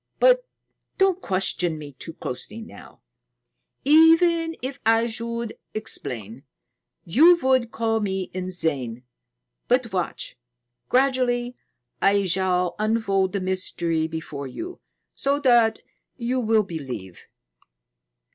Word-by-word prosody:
But - - +5 0.5
don't 385 -2 +2
question 180 - +1
me 150 -2 -9
too 150 +5 -9
closely 200 - -6
now. 225 - -13 0.8
Even 325 +2 +5
if 260 +1 -5
I 225 +1 +4
should 235 0 -4 0.2
explain, 125 - -2 0.6
you 320 - +6
would 260 -3 +2
call 225 -1 0
me 190 -3 -3
insane. 160 -10 -2 0.6
But 245 -4 +1
watch; 180 -7 -3 0.5
gradually 250 -2 +1 0.5
I 200 0 +3
shall 180 -1 +1
unfold 210 -3 +1
the 200 - -1
mystery 170 -3 -1
before 160 -3 -6
you, 345 - -7 0.3
so 280 +1 0
that 240 -4 +4 0.4
you 250 +1 -1
will 220 -2 +2
believe." 130 - -8
215 Hz, 105 wpm, -24 LUFS, 175-255 Hz, 0.8 s, you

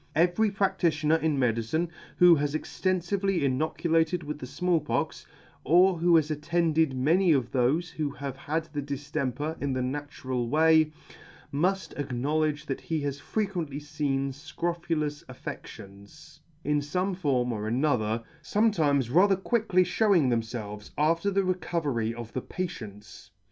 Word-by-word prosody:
Every 175 +7 +3
practitioner 170 -6 +1
in 160 -3 0
medicine, 125 +7 0 0.3
who 180 -1 +8
has 145 -1 0
extenfively 185 +2 -1
inocu 140 +4 -1
lated 165 +1 +2
with 150 0 -5
the 130 - -7
Small 170 +6 +1
Pox, 150 - -3 0.4
or 175 +4 +4 0.2
has 155 -1 +3
attended 160 -1 +1
many 165 +7 +3
of 130 -4 0
thofe 140 +7 +1
who 150 -2 -2
have 140 -1 -6
had 155 +4 -2
the 145 - -2
diftemper 140 +1 -3
in 140 -1 -1
the 130 -1 -1
natural 130 -3 -3
way, 160 +1 +4 0.6
muft 175 +2 -1
acknowledge 150 +3 -1
that 135 - -4
he 160 -2 -2
has 140 -1 -3
frequently 175 -5 -3
feen 145 -2 -2
fcrophulous 155 +1 -3
affeCtions, 100 +6 -10 0.2
in 150 +1 +1
fome 180 +7 -1
form 130 -8 0
or 105 -1 -3
another, 115 -3 0 0.2
fometimes 150 - +1
rather 195 +4 +5
quickly 190 -2 +2
fhewing 180 - +3
themfelves 110 -3 -3
after 165 +6 +2
the 195 0 +1
recovery 160 -11 -1
of 115 -1 -8
the 130 - -2
patients. 105 - -7
150 Hz, 135 wpm, -28 LUFS, 135-175 Hz, 0.6 s, who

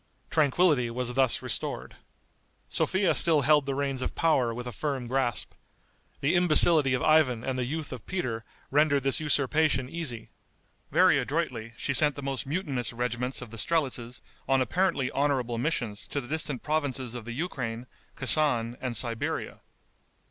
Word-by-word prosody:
Tranquillity 150 -4 +3
was 125 +1 -4
thus 130 -1 +1
restored. - - -4 0.7
Sophia 190 0 +1
still 160 -3 +4
held 145 0 +3
the 135 - -1
reins 135 -2 -1
of - - -3
power 135 -8 +2
with 120 +2 -6
a 125 - -5
firm 135 +3 -3
grasp. 120 -2 -1 0.7
The 140 - +2
imbecility 160 -5 +5
of 125 - -2
Ivan 145 -7 +3
and 130 0 -2
the 125 -1 -1
youth 150 +2 -4
of 125 - -10
Peter 125 -12 -3 0.3
rendered 145 -1 +3
this 135 -1 +1
usurpation 150 -2 +2
easy. 130 -8 -6 0.6
Very - - +4
adroitly 125 -7 -3
she 140 - -1
sent 150 +1 +4
the 140 - -7
most 135 -1 -3
mutinous 140 -6 -2
regiments 125 +2 -3
of 110 - -12
the 115 - -8
strelitzes 125 -4 -1 0.3
on 135 0 +4
apparently 135 - 0
honorable 130 -5 0
missions 120 -7 -2
to 145 - -2
the 125 - -8
distant 150 -3 -2
provinces 140 -5 -2
of 120 -3 -7
the 120 - -5
Ukraine, 125 -6 -4 0.3
Kesan, 125 -4 +2
and 125 -3 -2
Siberia. 115 -1 -2
135 Hz, 155 wpm, -28 LUFS, 120-150 Hz, 0.7 s, imbecility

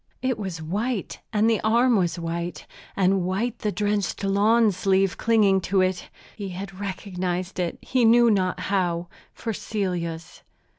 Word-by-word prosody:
It 255 -3 0
was 180 -6 -5
white 210 +6 -3
and 215 0 +2
the 225 -2 +2
arm 235 +3 +3
was 180 -3 +1
white, 170 +1 -4 0.3
and 190 0 +2
white 210 +7 -2
the 210 - -1
drenched 205 -2 -1
lawn 210 +3 +4
sleeve 190 0 +1
clinging 205 -4 +3
to 195 0 +3
it. 185 -1 -1 0.3
He 200 -3 -5
had 190 +1 -7
recognized 185 -2 -4
it, 175 -2 -2
he 255 -2 +1
knew 235 +1 +6
not 185 -3 0
how, 175 -3 -1 0.2
for 225 - -4
Celia's. 175 -6 -4
195 Hz, 150 wpm, -24 LUFS, 180-215 Hz, 0.3 s, knew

